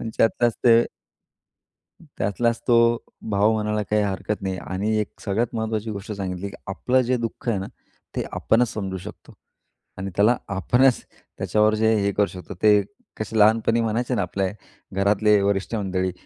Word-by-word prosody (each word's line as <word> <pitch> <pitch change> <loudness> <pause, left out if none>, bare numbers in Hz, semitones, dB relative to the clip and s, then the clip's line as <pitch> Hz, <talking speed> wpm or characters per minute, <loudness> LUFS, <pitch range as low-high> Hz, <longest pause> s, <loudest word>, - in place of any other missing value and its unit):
आणि 115 - -4
त्यांच्यातलच 120 +1 +3
ते 115 -2 +7 1.4
त्यातलाच 115 +3 0
तो, 115 0 +5 0.3
भाव 105 +2 +3
म्हणायला 105 -1 -1
काही 105 +1 +1
हरकत 100 +1 -3
नाही 95 -1 -2
आणि 100 +4 -2
एक 105 - -6
सगळ्यात 110 +4 -1
महत्त्वाची 110 -1 -2
गोष्ट 105 +1 -6
सांगितली, 95 -1 -4
की 100 - -11
आपलं 125 +6 +1
जे 125 +1 +1
दुःख 115 +1 -5
आहे 110 -4 +1
ना, 95 - -4 0.5
ते - - 0
आपणच 120 +1 +2
समजू 95 -3 -4
शकतो 90 - -11 0.7
आणि 95 +1 -4
त्याला 105 +5 +4 0.2
आपणच 125 +6 +3 0.4
त्याच्यावर 110 0 +2
जे 110 +1 +3
हे 100 0 +1
करू 105 - +3
शकतो 90 -1 -9
ते, 105 -1 +6 0.4
कसे 110 +1 -4
लहानपणी 115 +2 +4
म्हणायचे 115 +3 -1
ना, 105 - +1
आपल्या 95 +1 -1 0.5
घरातले 105 +1 +4
वरिष्ठ 100 +2 0
मंडळी, 95 -3 -1
105 Hz, 160 wpm, -23 LUFS, 100-115 Hz, 1.4 s, ते